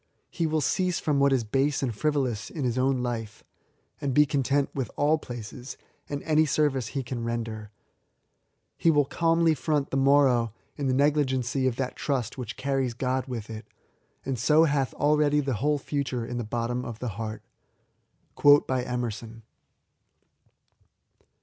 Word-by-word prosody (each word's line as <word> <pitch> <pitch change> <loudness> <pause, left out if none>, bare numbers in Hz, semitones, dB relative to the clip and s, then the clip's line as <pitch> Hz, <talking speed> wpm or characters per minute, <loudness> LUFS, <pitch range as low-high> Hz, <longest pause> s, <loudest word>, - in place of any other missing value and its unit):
He 165 -3 -1
will 155 0 0
cease 180 +3 0
from 145 -3 0
what 140 0 +4
is 130 -3 +2
base 135 +6 0
and 125 -4 -1
frivolous 135 -5 -1
in 150 - -5
his 120 -2 0
own 130 -1 +1
life, 115 -3 -4 0.6
and 135 -3 -1
be 150 - +6
content 140 0 0
with 130 -5 -3
all 150 +2 +2
places, 120 +1 -8 0.3
and 145 -1 -4
any 155 -1 +3
sorvice 140 -6 0
he 135 -2 -2
can 120 -1 -5
render. 115 -2 -4 1.1
He 165 - +4
will 145 -3 +4
calmly 165 +2 +2
ttont 150 -1 -1
the 135 - 0
morrow 135 -5 +3 0.2
in 140 -2 -2
the 130 - +2
neg^igenqr 135 -2 +1
of 125 - 0
that 130 0 -3
trust 130 -7 -2
which 120 -4 -6
carries 135 -3 -1
God 130 +1 -1
with 115 -4 -5
it, 110 0 -8 0.6
and 130 -3 -2
so 155 +5 +5
hath 140 -4 0
already 150 0 +3
the 135 -2 -1
whole 150 +1 +2
Aiture 135 -4 -3
in 120 0 -4
the - - -2
bottom 120 +3 -2
of 115 -3 -6
the 125 +1 -4
heart" 110 +1 -6 0.9
Ehkrson. 125 -5 +2
135 Hz, 155 wpm, -27 LUFS, 120-145 Hz, 1.1 s, be